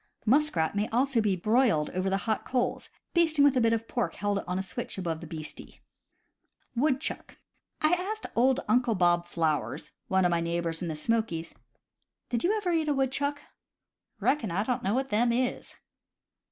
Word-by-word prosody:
Muskrat 235 - +2
may 205 +1 +1
also 250 0 +2
be 205 -3 +1
broiled 215 - +2
over 185 +1 -1
the 195 - +1
hot 220 -2 0
coals, 250 -2 -1 0.2
basting 320 -4 +4
with 285 -1 +4
a 255 - +3
bit 230 0 +3
of 225 0 -1
pork 240 - -2
held 205 -1 0
on 180 +1 -1
a 190 - -1
switch 190 - -5
above 165 -4 -3
the 165 - -8
beastie. 155 -1 -8 1.0
Woodchuck. 270 +2 -1 0.2
— - - -51
I 310 +3 +4
asked 405 +5 -2
old 255 +2 +3
Uncle 235 +1 +3
Bob 175 -1 +2
Flowers, 160 -3 -1 0.2
one 190 -1 +2
of 175 - +3
my 170 -1 +1
neighbors 170 0 -2
in 175 - -2
the 160 - -3
Smokies: 170 -2 -1 0.8
"Did 235 -2 -1
you 415 +5 +2
ever 390 -4 -1
eat 325 -2 +1
a 295 - +2
woodchuck 280 +2 0 0.4
?" - - -54
"Reckon 260 -8 +1
I 185 +4 0
don't 250 +1 -1
know 200 +2 0
what 265 +1 -1
them 235 +3 +2
is." 250 +1 -2
225 Hz, 185 wpm, -28 LUFS, 180-265 Hz, 1.0 s, basting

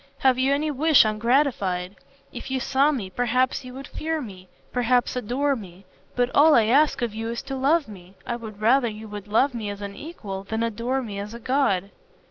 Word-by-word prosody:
have 260 -1 +3
you 265 +1 +2
any 300 +2 +1
wish 295 -1 +5
ungratified? 215 -5 0 0.4
If - - -7
you 265 0 -1
saw 275 +3 +2
me, 210 -10 -4
perhaps 250 +4 0
you 250 0 -10
would 270 +1 -8
fear 320 0 -3
me, 190 -8 -9 0.2
perhaps 245 0 +1
adore 255 +4 0
me, 190 -4 -11 0.3
but 245 0 +1
all 300 +2 +6
I 230 - +6
ask 275 +3 +3
of 230 -3 -2
you 225 +1 -4
is 235 0 -4
to 270 0 -5
love 280 +3 +2
me. 190 -2 -13
I 240 - -2
would 220 -3 -9
rather 240 +4 +3
you 220 0 -7
would 205 -1 -8
love 250 +6 +2
me 220 -3 -4
as 205 0 -6
an 200 0 -6
equal 205 - -7
than 220 +3 -2
adore 235 +4 -1
me 205 -4 -6
as 210 +3 -6
a - - -8
god." 225 -7 0
240 Hz, 210 wpm, -24 LUFS, 210-270 Hz, 0.4 s, all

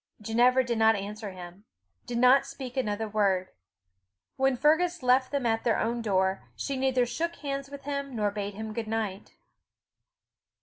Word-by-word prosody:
Ginevra 240 +4 +3
did 235 -2 -2
not 220 0 +5
answer 205 +2 -5
him 180 +1 -11 0.4
did 240 - -3
not 255 +3 +5
speak 270 -2 -8
another 220 -4 -1
word. 195 -3 +1 0.9
When 265 -1 +2
Fergus 320 +4 +2
left 255 +1 +3
them 280 -3 -1
at 225 -1 +1
their 230 - +2
own 235 +1 -1
door, 190 -3 0
she 275 - -3
neither 260 -1 +2
shook 330 +8 -3
hands 275 -2 -4
with 280 0 -9
him 280 -2 -4
nor 210 -2 0
bade 205 -1 -4
him 220 +1 -6
good 225 0 -4
night. 215 -3 -3
235 Hz, 165 wpm, -28 LUFS, 210-270 Hz, 0.9 s, not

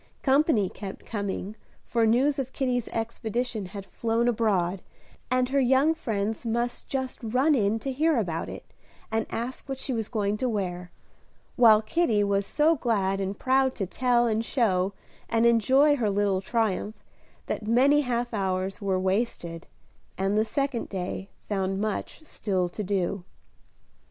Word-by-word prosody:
Company 270 - +3
kept 195 +1 -8
coming, 200 -1 -4 0.3
for 230 -1 +1
news 270 +6 +3
of 265 -1 -4
Kitty's 250 -3 -1
expedition 225 -1 -3
had 200 +1 -8
flown 230 +4 0
abroad, 195 -6 +1 0.5
and 255 0 +1
her 275 +1 +2
young 265 +4 +4
friends 220 -7 -2
must 235 +1 -2
just 260 -1 -3
run 255 +7 +2
in 215 -4 +2
to 270 - -3
hear 310 +2 +2
about 170 -7 -2
it, - - -8 0.5
and 225 0 0
ask 245 +4 -5
what 270 - -3
she 265 0 -4
was 225 -3 -3
going 210 -2 0
to 255 +3 -1
wear; 180 -5 -3 0.7
while 220 -3 +6
Kitty 225 -6 +2
was 200 -1 0
so 310 +2 +3
glad 195 -7 0
and 195 +1 -3
proud 265 0 +2
to 195 - -2
tell, 240 +4 +2
and 225 -1 +1
show, 200 -7 +1 0.4
and 230 0 +2
enjoy 260 +6 +5
her 225 -5 +1
little 200 -1 +1
triumph 215 0 -1 0.4
that 210 - -4
many 270 +6 +5
half 245 -2 -2
hours 190 0 -1
were 190 -2 0
wasted, 185 -4 -2 0.5
and 195 +2 0
the 215 - +4
second 265 +2 -2
day 190 +1 -4 0.2
found 195 -1 -1
much 215 +8 -3
still 190 -11 -1
to 210 +4 -5
do. 190 -1 -1
225 Hz, 155 wpm, -27 LUFS, 195-250 Hz, 0.7 s, while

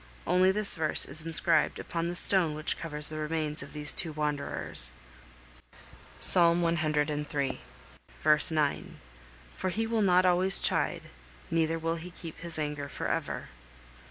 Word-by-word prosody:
Only 185 +2 +2
this 210 +1 +5
verse 160 -2 +6
is 155 - +3
inscribed 160 -1 +2
upon 170 0 -5
the 175 - -5
stone 175 -4 +5
which 155 +1 -3
covers 150 -2 -5
the 155 0 -8
remains 155 0 -3
of - - -11
these 150 0 -1
two 165 - +3
wanderers. 150 - -2 1.3
Psalm 170 - +2
ciii. 150 -3 -3 0.7
v. 155 +1 +4
9. 150 -2 -1 0.7
"For 185 - -4
He 225 +5 -3
will 225 -1 -2
not 185 -2 +2
always 185 +2 +3
chide, - - -1 0.5
neither 165 0 -1
will 165 +1 -4
He 170 +2 -10
keep 170 -2 -12
His 170 -1 -5
anger 150 -2 -5
for - - -6
ever." - - -5
160 Hz, 145 wpm, -27 LUFS, 150-175 Hz, 1.3 s, verse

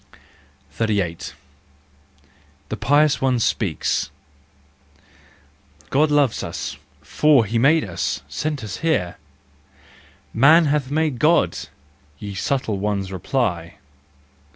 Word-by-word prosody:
38. 90 -5 -2 1.3
The - - -3
Pious 145 +2 +2
One 130 -2 +2
Speaks. 105 -6 -1 1.8
God 150 +3 +3
loves 145 -5 +2
us, - - -5 0.3
for 135 - +3
he 115 +3 -1
made 150 +6 +4
us, 85 -4 -3
sent 150 -5 -3
us 105 -3 -5
here!— 100 - -1 0.6
" - - -26 0.3
Man 155 +8 +6
hath 145 -2 0
made 150 -3 0
God 160 +2 +3 0.3
!" 70 +1 -35
ye 100 +6 -7
subtle 110 0 -2
ones 100 -1 -2
reply. 95 -4 -2
120 Hz, 105 wpm, -21 LUFS, 95-150 Hz, 1.8 s, Man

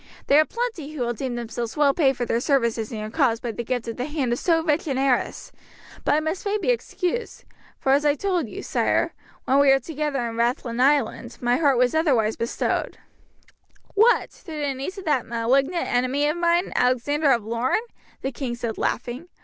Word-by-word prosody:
There 290 +2 +6
are - - +1
plenty 445 - -4
who 280 -5 -2
will 240 0 -1
deem 245 +1 -4
themselves 235 0 -5
well 290 -2 +4
paid 270 -4 +2
for 245 - -1
their 230 - 0
services 235 -5 0
in 225 - -5
your 215 0 -5
cause 240 -5 +2
by 240 - -4
the 235 - -5
gift 245 0 -3
of 230 - -5
the 250 - -2
hand 285 -5 -1
of 240 - -2
so 330 -2 +2
rich 315 0 0
an 270 -3 -1
heiress. 265 -2 0 0.5
But - - +3
I - - +3
must 315 +4 -3
fain 415 +1 0
be 415 - -1
excused; 460 -1 -3 0.3
for 265 - 0
as 280 +2 +4
I 290 -1 +3
told 355 - -1
you, - - -7
sire, - - +1 0.3
when 270 +2 +3
we 280 -1 +5
were 270 - +6
together 280 -2 -2
in 230 0 -6
Rathlin 235 0 0
Island, 270 -3 +1
my 245 0 +2
heart 285 -5 +3
was 250 0 +3
otherwise 255 -10 +2
bestowed." 230 - -2 1.0
"What! 445 +4 +4
to - - -21
the 295 -3 -2
niece 275 +10 -5
of 390 - -8
that 295 -6 +1
malignant 270 +9 +1
enemy 255 +4 +1
of 300 - 0
mine, 345 +1 +1
Alexander 275 +4 +2
of 235 -4 +1
Lorne?" 235 +3 0 0.5
the 270 - -1
king 245 -1 -4
said 235 -2 -4
laughing. 250 +8 -3
270 Hz, 205 wpm, -24 LUFS, 240-310 Hz, 1.0 s, There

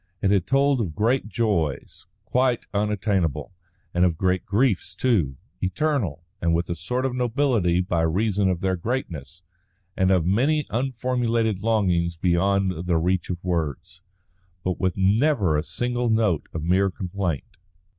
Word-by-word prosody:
It 95 - +1
had 95 -4 +2
told 135 -1 +3
of 85 -8 -3
great 115 +2 +1
joys, 100 - -2 0.2
quite 125 -1 +1
unattainable, 100 - -1 0.4
and 90 - +2
of 85 -3 +2
great 95 0 0
griefs 100 -4 +1
too, 90 - +1 0.2
eternal, 95 - -1 0.2
and 85 -1 +2
with 85 +1 -1
a - - -1
sort 125 +11 -2
of 130 - -1
nobility 120 -8 +1
by 90 -2 0
reason 100 +4 +1
of 90 -2 -1
their 95 -1 +1
greatness; 85 - -5 0.5
and 95 0 +2
of 90 -4 +3
many 135 - +2
unformulated 120 -4 0
longings 90 -6 +1
beyond 90 0 +1
the 85 -2 +2
reach 90 +2 0
of 85 -1 -4
words; 85 -1 -3 0.6
but 90 -1 -2
with 95 -2 0
never 100 - +2
a 75 - +2
single 120 +7 -2
note 110 -8 +1
of 80 - -5
mere 95 +3 +3
complaint. 90 -4 -4
95 Hz, 145 wpm, -24 LUFS, 85-115 Hz, 0.6 s, told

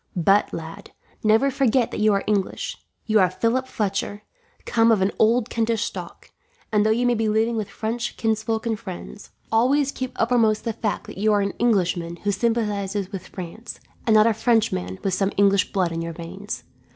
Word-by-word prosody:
But, 195 +4 +3
lad, 165 +5 -8 0.3
never 225 +6 +4
forget 255 -3 +2
that - - -4
you 215 0 +4
are 200 -1 +1
English. 200 -3 -1 0.3
You 220 -1 +3
are 185 -2 +4
Philip 235 +7 0
Fletcher, 205 -2 -2 0.4
come 230 0 +3
of 220 - +4
an 195 - +1
old 230 +1 +3
Kentish 225 -2 0
stock; - - -7 0.4
and 210 -1 +3
though 215 - +2
you 235 +3 +2
may 245 - +3
be 225 -1 0
living 220 +2 +1
with 215 -2 -3
French 230 +3 -3
kinsfolk 220 0 -1
and 225 -2 -1
friends, 195 -1 -9 0.2
always 270 +5 +3
keep 255 -2 -5
uppermost 225 -2 +2
the 230 - -2
fact 210 -3 -3
that - - -9
you 215 +1 +3
are 205 - +3
an 200 -1 -1
Englishman 180 -7 +1
who 205 - +1
sympathizes 205 -3 -1
with 190 -2 -6
France, 185 +5 -8 0.3
and 220 - +5
not 215 0 +7
a 230 - +4
Frenchman 145 - 0
with 195 - 0
some 195 +1 +1
English 200 0 +3
blood 185 -4 0
in 165 0 -3
your 165 0 -4
veins. 185 +6 -7
215 Hz, 190 wpm, -23 LUFS, 195-230 Hz, 0.4 s, not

